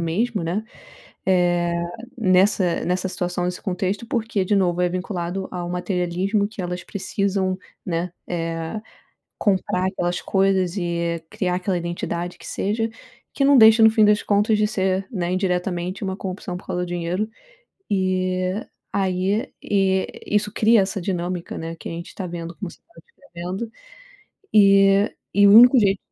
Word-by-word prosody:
mesmo, 200 +5 -1
né, 185 +6 -1 0.6
eh, 175 -2 +2 0.5
nessa 185 -3 +3
nessa 185 +1 -1
situação, 180 -1 -2
nesse 180 0 -4
contexto, 195 +4 -2
porque, 225 -6 -1
de 205 +2 +2
novo, 180 -2 +1
é 180 - +3
vinculado 185 0 -3
ao 175 -1 -4
materialismo 180 +3 -1
que 215 -3 -8
elas 180 0 -4
precisam, 195 -1 -1 0.3
né, 170 0 -2 0.2
eh, 165 +3 -3 0.6
comprar 185 -2 +1
aquelas 175 -2 -2
coisas 190 -1 +1
e 170 -2 -1
criar 180 -1 -1
aquela 185 0 -1
identidade 170 0 -4
que - - -12
seja, 225 +3 -1 0.5
que 275 - +1
não 280 -1 +6
deixa 220 0 +8
no 220 - +8
fim 220 -1 +4
das 210 0 +4
contas 210 +2 +2
de 210 - +3
ser, 190 -2 0
né, 180 -3 -2
indiretamente 180 0 -1
uma 190 -1 -2
corrupção 185 -2 -5
por - - -11
causa 180 - -2
do - - -7
dinheiro 175 +4 -2 0.6
e 185 -1 0 0.4
aí, 195 +3 0
eh, 190 -1 0
isso 210 0 +1
cria 225 0 +4
essa 195 +1 -3
dinâmica, 175 -1 -3
né, 165 0 -6
que - - -8
a - - -5
gente 170 +1 -7
tá 190 - -5
vendo 170 -1 -6
como 195 - -5
você - - -17
tá 340 - -29
descrevendo, 220 - -7 0.8
eh, 195 0 +5 0.2
e 205 0 +5
o - - +7
único 245 +4 +9
jeito 200 -3 +3
185 Hz, 155 wpm, -22 LUFS, 175-205 Hz, 0.8 s, único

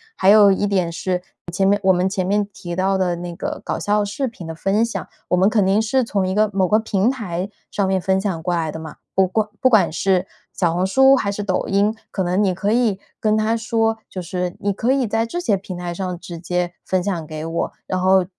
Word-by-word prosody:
还 190 - +3
有 205 -1 +8
一 200 +2 +1
点 185 -4 0
是， 180 +1 -2 0.3
前 195 +2 +1
面 205 +1 +3
我 190 - +5
们 180 0 +2
前 190 -1 -1
面 205 +1 +1
提 175 -2 -6
到 190 +2 +1
的 185 -2 +1
那 175 0 -6
个 - - -4
搞 - - -2
笑 210 0 +1
视 260 +7 -2
频 225 -7 -9
的 165 - -5
分 195 +7 +1
享， 200 -7 -5 0.2
我 180 - +2
们 190 +3 +4
肯 210 -3 +2
定 195 +3 +3
是 250 +4 +1
从 200 -5 -1
一 185 - -1
个 215 +1 +4
某 190 -1 +2
个 210 - +4
平 220 -1 +1
台 200 -7 -3 0.2
上 200 -2 0
面 190 0 +1
分 190 +1 +1
享 185 -5 -3
过 180 - 0
来 160 -2 -1
的 - - -6
嘛。 160 -1 -9 0.2
不 190 0 +4
过 215 +3 -1
不 260 - +5
管 220 -5 +4
是 185 +2 +1 0.3
小 170 -3 +1
红 180 +2 +1
书 265 +6 +6
还 200 -6 0
是 205 +1 -4
抖 190 -2 -1
音， 205 +2 +2
可 190 - -2
能 180 +3 +1
你 195 - +2
可 200 +3 -1
以 225 -5 +2 0.2
跟 215 0 +2
他 215 +1 +1
说， 225 -1 0
就 185 - -6
是 180 +1 -3
你 200 0 0
可 230 +6 0
以 270 -1 +2
在 225 +1 0
这 230 +10 -4
些 235 -12 +1
平 190 -1 -7
台 175 -1 -4
上 180 -1 -4
直 175 -2 -8
接 175 +1 -2
分 185 -1 0
享 175 -5 -3
给 155 0 -6
我。 165 +1 -2
然 185 0 -2
后 185 0 +4
190 Hz, 270 characters per minute, -21 LUFS, 180-215 Hz, 0.3 s, 有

